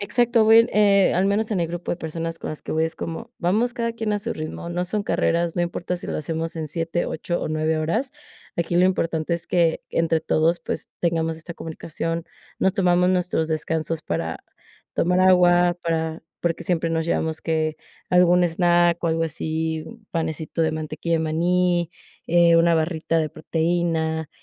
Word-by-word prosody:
Exacto, 235 +2 +2
voy 225 +1 +7
en, 230 - +1
eh, 200 -2 +5
al 185 +2 +2
menos 210 +3 0
en 190 - 0
el 165 - 0
grupo 175 +1 -4
de - - -3
personas 165 0 -5
con - - -4
las 155 - -7
que - - -5
voy 160 - +1
es 160 - -4
como 165 -1 -6
vamos, 220 +8 +1
cada 230 -1 -1
quien 225 -2 -2
a 205 - +1
su - - -3
ritmo, 155 +2 -6
no 175 +1 -1
son 205 +2 -2
carreras, 170 0 +1
no 175 - +2
importa 175 +1 -3
si - - -9
lo - - -2
hacemos 165 +2 -3
en 160 -1 -3
7, 165 +2 -2
8, 175 +2 -3
o - - -2
9 155 0 0
horas, 220 - -1 0.5
aquí 170 0 -1
lo 180 - +5
importante 165 -2 0
es 170 - -5
que 170 -2 +2
entre 165 -1 +1
todos, 160 +2 +2
pues, - - -5
tengamos 165 -1 0
esta 165 +1 -9
comunicación. 165 +1 -4 0.4
Nos 190 - +3
tomamos 180 -2 +3
nuestros 180 -3 0
descansos 160 0 -2
para 80 - -3 0.6
tomar 180 +2 +2
agua, 175 -1 +5
para 160 -1 -1 0.2
porque 170 0 -1
siempre 165 -1 0
nos 165 0 -1
llevamos 160 -1 -1
que 155 -1 0 0.3
algún 180 0 +5
snack 175 0 +3
o - - +2
algo 165 0 +1
así, 160 0 -2 0.3
panecito 160 0 -2
de 160 0 +1
mantequilla 155 +1 -2
de - - 0
maní, 175 +2 +1 0.4
eh, 170 0 +5
una 170 0 +4
barrita 165 0 0
de 155 - -1
proteína, 160 -1 -1
170 Hz, 185 wpm, -23 LUFS, 160-180 Hz, 0.6 s, voy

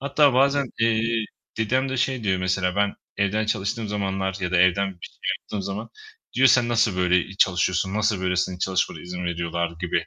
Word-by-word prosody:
Hatta 140 0 +3
bazen, 140 +1 +3
eee, 115 0 +2 0.3
dedem 130 +5 +1
de 130 - -2
şey 125 -2 -1
diyor 95 -2 +1
mesela, 90 0 0
ben 100 0 +1 0.2
evden 105 +2 0
çalıştığım 110 +1 -2
zamanlar 95 -2 -2
ya 90 -2 -2
da - - +3
evden 90 +2 +3
bir - - -7
şey - - -20 0.2
yaptığım 100 -2 -6
zaman, 105 +4 -5 0.5
diyor 130 +1 +6
"Sen 120 0 +4
nasıl 115 -5 +2
böyle, 90 0 +3
eee, 95 - -11
çalışıyorsun, 95 +1 +2
nasıl 105 -2 +1
böylesinin 90 0 -1
çalışmana 95 -3 -1
izin 90 0 -6
veriyorlar." 85 0 -2
gibi. 90 - -1
100 Hz, 185 wpm, -24 LUFS, 90-115 Hz, 0.5 s, diyor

